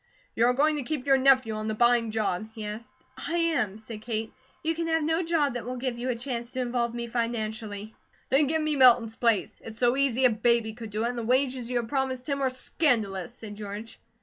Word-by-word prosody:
"You 235 - +4
are 250 - +4
going 300 +4 +2
to - - -2
keep 290 -1 -3
your 270 -1 +4
nephew 260 -4 +4
on 215 0 -4
the 215 - -1
buying 240 0 +3
job?" 215 -2 -1
he 215 -2 -6
asked 215 +3 -7 0.2
"I 335 - -3
am," 285 - +1
said 220 0 -9
Kate. 220 -1 -3 0.3
"You 325 +1 +1
can 330 0 -3
have 325 -1 +1
no 320 +3 +1
job 325 -6 +1
that 245 - -4
will 250 +3 -4
give 250 -1 -3
you 250 +2 -2
a 250 - 0
chance 240 -1 -4
to 260 - -3
involve 240 -1 -1
me 235 0 -3
financially." 220 -3 -3 0.4
"Then 275 +3 +4
give 315 +2 0
me 305 -1 0
Milton's 240 -4 +5
place. 230 -4 0
It's 220 -1 -8
so 245 +1 +3
easy 265 -2 +2
a 250 - +6
baby 225 0 +1
could 225 -1 -8
do 210 +2 -2
it, - - +1
and 245 - -5
the - - -3
wages 255 0 +1
you 250 - 0
have 235 -1 -2
promised 260 -1 -2
him 280 -1 -1
are 265 - +2
scandalous," 230 - 0
said 220 -4 -9
George. 210 +2 -8
240 Hz, 235 wpm, -27 LUFS, 220-265 Hz, 0.4 s, a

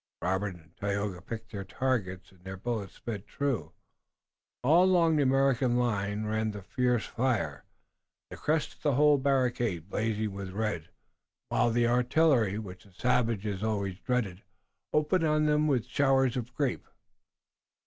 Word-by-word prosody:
Robert 95 +1 -1
and 80 -1 -19
Tayoga 100 -2 -2
picked 110 +4 -7
their 100 -3 -5
targets, 95 -5 -2
and 90 -2 -23
their 95 0 -7
bullets 110 -1 -4
sped 105 -4 -6
true. 140 -6 -2 0.9
All 165 +8 +5
along 170 -4 +4
the 150 - +3
American 135 -2 +3
line 105 -3 0
ran 110 +1 0
the 105 -2 -7
fierce 125 0 0
fire, 125 -2 -1 0.7
the - - -6
crest 155 0 0
of - - -26
the 145 -4 +1
whole 145 0 +5
barricade 120 - 0
blazing 110 -1 -1
with 100 -1 -6
red, 105 -6 -2 0.6
while - - +2
the 120 +1 +2
artillery, 125 -3 +3
which 95 -4 -8
the 100 - -21
savages 110 -4 0
always 100 -4 -2
dreaded, 110 -8 -1 0.5
opened 150 +4 +2
on 155 -1 +2
them 150 0 +3
with 130 -6 +1
showers 135 -3 +2
of 125 -1 -4
grape. 140 -4 -1
115 Hz, 150 wpm, -29 LUFS, 100-135 Hz, 0.9 s, All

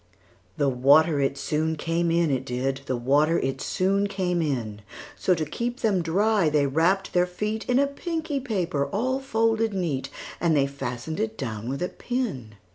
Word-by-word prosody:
The 145 -2 +2
water 140 +4 +4
it 140 0 0
soon 160 +2 -1
came 165 +2 0
in, 165 -2 +2
it 130 -1 0
did; 135 +2 -2
The 130 - 0
water 145 +7 +3
it 135 0 -2
soon 195 +2 +1
came 185 -3 -1
in:So, 115 - -2
to 155 -1 -2
keep 240 - -4
them 200 -5 +2
dry, 195 +2 +2
they 150 -1 +2
wrapp'd 170 +8 +1
their 180 0 +3
feetIn 215 +7 -1
a 280 - +4
pinky 315 0 -3
paper 180 - -1
all 255 +6 -1
folded 225 -4 +1
neat:And 155 0 -2
they 140 - +4
fasten'd 140 +2 -5
it 220 0 -2
down 115 -3 -4
with 135 +5 -2
a 180 - -1
pin. 190 - -4
165 Hz, 165 wpm, -25 LUFS, 140-210 Hz, -, water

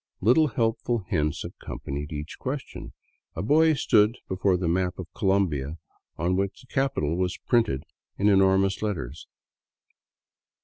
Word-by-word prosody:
Little 125 - +4
helpful 115 -2 0
hints 75 -4 0
accompanied 70 +2 -6
each 75 +1 -6
question. 135 +1 -5 0.4
A 80 - -3
boy 155 +7 +4
stood 110 -3 +3
before 95 0 +1
the 90 -1 -2
map 90 +2 0
of 95 - -5
Colombia, 85 -7 0 0.4
on 90 +3 +1
which 100 +1 -2
the 130 - -20
capital 110 - 0
was 90 0 -1
printed 115 - +2 0.3
in 100 - +2
enormous 95 -1 +4
let 105 -2 0
ters. 70 0 -8
95 Hz, 135 wpm, -26 LUFS, 85-115 Hz, 0.4 s, Little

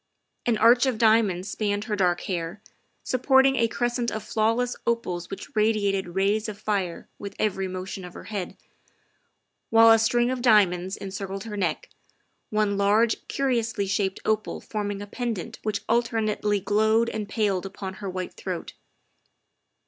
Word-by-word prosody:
An 235 -2 +3
arch 240 +4 +5
of 250 -4 0
diamonds 215 -5 +3
spanned 205 0 -1
her 215 -1 -2
dark 180 -3 +1
hair, 175 +1 -4 0.4
supporting 265 +1 +4
a 230 -3 +3
crescent 240 +1 -1
of 220 -2 -5
flawless 230 +3 0
opals 180 -7 -1
which 195 - -8
radi 215 -1 +2
ated 195 -3 -1
rays 205 +3 +1
of 205 - -7
fire 200 -5 -2
with 200 -1 -7
every 195 -3 0
motion 185 +1 -6
of 180 -1 -10
her - - -9
head, 200 -4 -5 1.1
while 225 0 +7
a 225 - +6
string 240 +2 +2
of 255 -1 -3
diamonds 190 -5 +3
encircled 195 0 -5
her 220 -2 -6
neck, 175 -6 -1 0.6
one 210 -2 +1
large, 210 +3 +2
curiously 235 -6 0
shaped 195 -1 -1
opal 215 -1 0
forming 205 -2 -4
a - - -6
pendant 225 -3 -4
which 210 -1 -2
alter 230 0 +1
nately 210 -1 0
glowed 220 +3 +2
and 215 -3 -4
paled 195 -4 0
upon 190 0 -7
her 200 - -3
white 185 0 -5
throat. - - -5
210 Hz, 155 wpm, -25 LUFS, 195-225 Hz, 1.1 s, while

